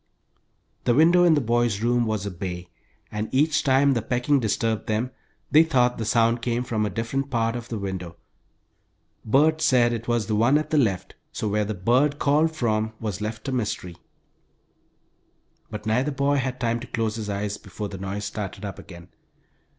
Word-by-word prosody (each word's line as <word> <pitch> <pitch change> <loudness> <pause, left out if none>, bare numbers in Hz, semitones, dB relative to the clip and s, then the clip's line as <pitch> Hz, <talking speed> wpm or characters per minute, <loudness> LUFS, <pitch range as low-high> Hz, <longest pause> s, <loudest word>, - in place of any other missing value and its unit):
The 120 - +3
window 170 +4 +5
in 165 -2 +5
the 145 - +2
boys' 120 -3 +1
room 120 0 +2
was 110 -2 -2
a 100 - -3
bay, 90 -1 -6 0.4
and 105 +1 -3
each 155 +3 +2
time 140 0 +4
the 115 - 0
pecking 125 +5 +1
disturbed 115 -1 -1
them 110 +3 -1 0.4
they 150 +3 +7
thought 125 -7 +2
the 110 - -2
sound 115 +1 +2
came 120 +1 -1
from 110 -3 -1
a - - -2
different 115 +7 -3
part 115 -2 0
of 120 -1 -6
the 115 - -3
window. 95 -4 -5 1.1
Bert 155 +7 +3
said 125 -6 +4
it 115 0 -5
was 120 -3 +1
the 110 - -2
one 120 +7 +4
at 155 - -3
the 155 - +3
left, 95 -8 0 0.2
so 110 - -3
where 105 +1 0
the 110 +1 -3
"bird" 125 +10 +2
called 150 +3 +2
from 110 -5 0
was 105 -3 -4
left 110 +2 -5
a - - -1
mystery. 105 -8 -3 1.7
But 105 -1 -7
neither 125 +6 +1
boy 140 0 +1
had 125 -1 -2
time 115 -1 0
to 125 - -9
close 115 -2 -1
his 110 -2 -5
eyes 100 +1 -3
before 105 -2 -7
the 95 - -8
noise 100 +2 -4
started 100 -1 -5
up 100 - -6
again! 85 0 -12
115 Hz, 190 wpm, -24 LUFS, 105-130 Hz, 1.7 s, they